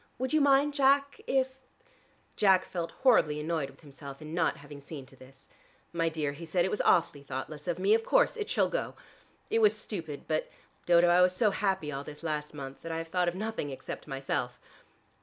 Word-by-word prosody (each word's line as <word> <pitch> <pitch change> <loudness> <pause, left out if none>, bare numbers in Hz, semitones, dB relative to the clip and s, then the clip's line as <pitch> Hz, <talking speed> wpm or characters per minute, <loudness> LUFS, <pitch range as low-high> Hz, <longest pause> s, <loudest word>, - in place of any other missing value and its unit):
Would 260 +2 -2
you 310 - +4
mind, 285 +1 +4
Jack, 280 0 +3
if 265 0 +2 0.4
" - - -33 0.3
Jack 190 -3 +4
felt 170 -2 -4
horribly 155 - +4
annoyed 155 -2 -2
with 135 - -18
himself 140 -2 -11
in 155 0 -8
not 165 -1 +1
having 145 0 -11
seen 140 -1 -8
to 135 - -17
this. 135 +1 -17 0.5
"My 165 -1 +1
dear," 155 -3 -2
he 145 +4 -10
said, 175 +2 +1
"it 190 - -1
was 210 - 0
awfully 160 -4 +3
thoughtless 140 +3 -6
of 175 -1 -1
me. 195 +3 +3
Of 225 0 +3
course, - - +3
it 425 -2 -4
shall - - +2
go. - - -3 0.6
It 225 - +3
was 215 -1 +4
stupid, 165 -9 -6
but, 155 0 -1 0.4
Dodo, 175 0 +6
I 175 +1 +5
was 180 0 +4
so 210 +1 +3
happy 190 -6 -1
all 140 -1 -4
this 150 +2 -10
last 150 -2 -3
month, 135 -2 -8
that 165 - -6
I 165 - -2
have 165 0 -5
thought 180 0 +1
of 175 - 0
nothing 215 -6 -3
except 135 - -7
myself." 135 -3 -3
165 Hz, 215 wpm, -30 LUFS, 145-210 Hz, 0.6 s, Dodo